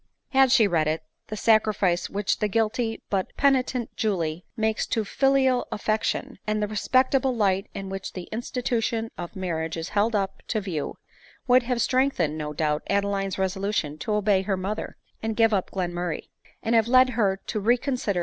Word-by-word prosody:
Had 265 Hz, -1 st, +4 dB
she 240 Hz, -4 st, +6 dB
read 165 Hz, -5 st, +1 dB
it, 160 Hz, +1 st, -1 dB, 0.2 s
the 215 Hz, -, -5 dB
sacrifice 210 Hz, -5 st, +2 dB
which 200 Hz, 0 st, -1 dB
the 210 Hz, -, +1 dB
guilty 225 Hz, +2 st, -1 dB
but 195 Hz, -2 st, 0 dB
peni 270 Hz, -2 st, +4 dB
tent 250 Hz, -2 st, -5 dB
Julie 175 Hz, -6 st, -1 dB
makes 220 Hz, -1 st, 0 dB
to 220 Hz, -2 st, 0 dB
filial 265 Hz, +1 st, +2 dB
affection, 215 Hz, +1 st, -1 dB
and 215 Hz, 0 st, 0 dB
the 210 Hz, -, 0 dB
respectable 255 Hz, +4 st, +2 dB
light 195 Hz, -3 st, +1 dB
in 195 Hz, 0 st, -5 dB
which 195 Hz, 0 st, -5 dB
the 180 Hz, -2 st, -7 dB
institution 230 Hz, -1 st, -2 dB
of 175 Hz, -, -7 dB
marriage 165 Hz, -4 st, -3 dB
is 160 Hz, -, -4 dB
held 215 Hz, +2 st, +1 dB
up 195 Hz, -1 st, -1 dB
to 220 Hz, -, 0 dB
view, 180 Hz, -8 st, -4 dB, 0.5 s
would 255 Hz, 0 st, +5 dB
have 240 Hz, -2 st, 0 dB
strengthened 255 Hz, -, +1 dB
no 150 Hz, -1 st, -4 dB
doubt, 150 Hz, 0 st, 0 dB
Adeline's 200 Hz, -1 st, 0 dB
reso 190 Hz, 0 st, -1 dB
lution 165 Hz, -7 st, -1 dB
to 215 Hz, -, -2 dB
obey 210 Hz, -2 st, +3 dB
her 195 Hz, 0 st, -1 dB
mother, 195 Hz, +3 st, -4 dB, 0.2 s
and 220 Hz, 0 st, -2 dB
give 225 Hz, -1 st, +4 dB
up 190 Hz, -3 st, 0 dB
Glenmurray; 175 Hz, -2 st, -3 dB, 0.3 s
and 230 Hz, -, 0 dB
have 225 Hz, -1 st, +4 dB
led 255 Hz, +1 st, +6 dB
her 200 Hz, -5 st, +1 dB
to 215 Hz, -, -2 dB
reconsider 240 Hz, -2 st, +1 dB
210 Hz, 180 wpm, -25 LUFS, 190-235 Hz, 0.5 s, she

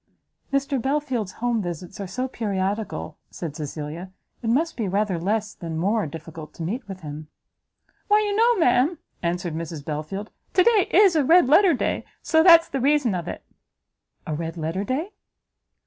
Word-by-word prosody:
"If 275 Hz, 0 st, +1 dB
Mr 275 Hz, -4 st, -1 dB
Belfield's 265 Hz, -7 st, -1 dB
home 240 Hz, -1 st, -1 dB
visits 175 Hz, 0 st, -6 dB
are 200 Hz, -, -4 dB
so 255 Hz, +8 st, -3 dB
periodical," 205 Hz, -3 st, -3 dB
said 160 Hz, -5 st, -6 dB
Cecilia, 155 Hz, +4 st, -6 dB, 0.3 s
"it 225 Hz, -, -2 dB
must 315 Hz, +8 st, +1 dB
be 220 Hz, -4 st, -2 dB
rather 195 Hz, -2 st, 0 dB
less, 210 Hz, +4 st, -1 dB
than 165 Hz, -3 st, -6 dB
more, 200 Hz, +3 st, +1 dB
difficult 160 Hz, +1 st, -9 dB
to 165 Hz, -, -6 dB
meet 215 Hz, +8 st, -4 dB
with 190 Hz, -1 st, -8 dB
him." 150 Hz, 0 st, -7 dB, 0.8 s
"Why 420 Hz, +1 st, +5 dB
you 410 Hz, -1 st, -1 dB
know, 470 Hz, +2 st, +4 dB
ma'am," 300 Hz, +1 st, +3 dB, 0.2 s
answered 175 Hz, -1 st, -2 dB
Mrs 160 Hz, -2 st, -6 dB
Belfield, 155 Hz, +8 st, -5 dB, 0.2 s
"to 370 Hz, -, +6 dB
day 435 Hz, -2 st, +4 dB
is 385 Hz, -2 st, +5 dB
a 305 Hz, -, +3 dB
red 335 Hz, +4 st, +6 dB
letter 335 Hz, +4 st, +6 dB
day, -, -, -1 dB, 0.2 s
so 320 Hz, 0 st, +4 dB
that's 335 Hz, -1 st, +8 dB
the 270 Hz, -, -3 dB
reason 280 Hz, -4 st, +3 dB
of 175 Hz, -2 st, -3 dB
it." -, -, -6 dB, 0.8 s
"A 155 Hz, -, -3 dB
red 165 Hz, +2 st, -4 dB
letter 165 Hz, +4 st, -2 dB
day?" 290 Hz, -, -2 dB
210 Hz, 175 wpm, -24 LUFS, -, 0.8 s, that's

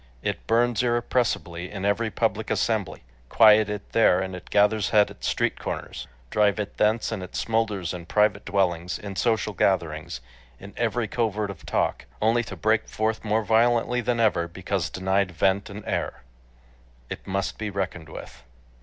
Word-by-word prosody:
It -, -, -3 dB
burns 120 Hz, 0 st, +2 dB
irrepressibly 120 Hz, -8 st, -1 dB
in 100 Hz, -1 st, -5 dB
every 110 Hz, +3 st, +1 dB
public 110 Hz, 0 st, -1 dB
assembly; 100 Hz, -, -1 dB, 0.3 s
quiet 110 Hz, -2 st, +6 dB
it 105 Hz, -1 st, -6 dB
there, 105 Hz, -5 st, +4 dB
and 95 Hz, -1 st, -3 dB
it 90 Hz, -, -11 dB
gathers 105 Hz, 0 st, +3 dB
head 105 Hz, -1 st, +4 dB
at -, -, -15 dB
street -, -, 0 dB
corners; -, -, -5 dB, 0.2 s
drive 105 Hz, -1 st, +2 dB
it 105 Hz, -1 st, -5 dB
thence, 110 Hz, +2 st, +2 dB
and 110 Hz, -4 st, -3 dB
it 90 Hz, -, -9 dB
smolders 105 Hz, -6 st, -1 dB
in 85 Hz, -2 st, -8 dB
private 105 Hz, 0 st, +2 dB
dwellings, 90 Hz, -3 st, 0 dB
in 100 Hz, -2 st, -7 dB
social 110 Hz, -1 st, 0 dB
gatherings, 80 Hz, -7 st, 0 dB, 0.4 s
in 100 Hz, +1 st, -11 dB
every 120 Hz, 0 st, 0 dB
covert 105 Hz, -2 st, -1 dB
of 90 Hz, -, -13 dB
talk, -, -, -1 dB
only 115 Hz, +2 st, +2 dB
to 95 Hz, -, -7 dB
break 110 Hz, +6 st, +1 dB
forth 110 Hz, 0 st, -2 dB
more 110 Hz, +1 st, +1 dB
violently 120 Hz, +2 st, +2 dB
than 120 Hz, 0 st, -1 dB
ever 105 Hz, -7 st, +2 dB
because 95 Hz, +1 st, -3 dB
denied 95 Hz, +1 st, 0 dB
vent 95 Hz, +4 st, +1 dB
and 100 Hz, +1 st, -9 dB
air. -, -, -3 dB, 0.9 s
It -, -, -7 dB
must 95 Hz, 0 st, -2 dB
be 105 Hz, -1 st, -3 dB
reckoned 95 Hz, -5 st, -4 dB
with -, -, -10 dB
105 Hz, 165 wpm, -25 LUFS, 95-110 Hz, 0.9 s, quiet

